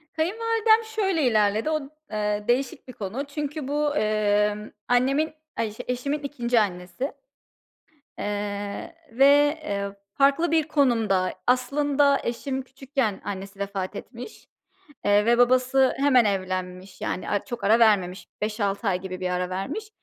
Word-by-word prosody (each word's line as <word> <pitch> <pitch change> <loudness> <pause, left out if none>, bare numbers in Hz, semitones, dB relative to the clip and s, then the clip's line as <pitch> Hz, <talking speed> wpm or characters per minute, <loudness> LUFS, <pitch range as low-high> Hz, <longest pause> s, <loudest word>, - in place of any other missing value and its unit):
Kayınvalidem 445 +6 +2
şöyle 390 -8 0
ilerledi. 215 +1 +2
O 310 -1 0
d - - -9 0.3
eee, 210 0 -1
değişik 250 +2 0
bir 255 - -9
konu. 215 +7 -4
Çünkü 295 -1 -4
bu, 295 +1 0
emm, 210 -2 +1 0.2
annemin, 275 +6 +2 0.2
ay, 230 -1 0
işte, 210 - -8
eşimin 265 +4 -1
2'nci 245 -5 0
annesi. 180 - -2 1.1
Eee, 205 +8 -4 0.2
ve, 265 +4 +4 0.4
eee, 200 -6 -2 0.3
farklı 280 +5 +3
bir 320 -1 +2
konumda, 225 -11 +2
aslında 280 +3 +3
eşim 260 +3 -3
küçükken 265 -5 -3
annesi 195 0 -6
vefat 200 0 -3
etmiş, 245 - -9 0.6
eee, 205 0 +4
ve 235 +1 +4
babası 255 +2 +4
hemen 265 -4 +4
evlenmiş, 185 -1 -3
yani, 185 - -3
a 205 - -1
çok 240 - -6
ara 220 +3 +4
vermemiş. 200 -5 +3
5-6 210 0 -1
ay 180 -1 +1
gibi 185 -1 -6
bir 185 - -2
ara 180 0 -1
vermiş. 280 - -4
235 Hz, 140 wpm, -25 LUFS, 205-280 Hz, 1.1 s, ve